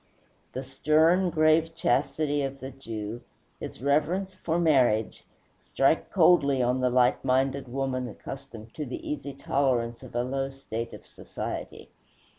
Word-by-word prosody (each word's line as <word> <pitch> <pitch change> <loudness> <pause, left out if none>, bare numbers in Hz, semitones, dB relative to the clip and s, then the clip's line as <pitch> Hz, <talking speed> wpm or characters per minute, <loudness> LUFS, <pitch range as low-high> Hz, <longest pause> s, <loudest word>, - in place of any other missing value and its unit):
The 130 - -4
stern, 160 +7 +3
grave 160 0 +3
chastity 155 -3 +1
of 135 0 -4
the 135 +1 -7
Jew, 115 -3 -6 0.4
his 125 - -8
reverence 160 +7 +1
for 165 -2 -2
marriage, 130 -10 +2 0.3
strike - - +1
coldly 140 -6 +4
on 125 +1 +1
the 130 0 +2
light 125 0 +3
minded 135 +1 +1
woman 130 -1 -2
accustomed 115 -3 -9
to 155 - -4
the 125 - -6
easy 140 -1 -4
tolerance 125 -4 0
of 130 -2 -12
a 120 - +1
low 135 +1 -2
state 115 -4 -6
of - - -11
society. - - -7
135 Hz, 140 wpm, -27 LUFS, 125-150 Hz, 0.4 s, coldly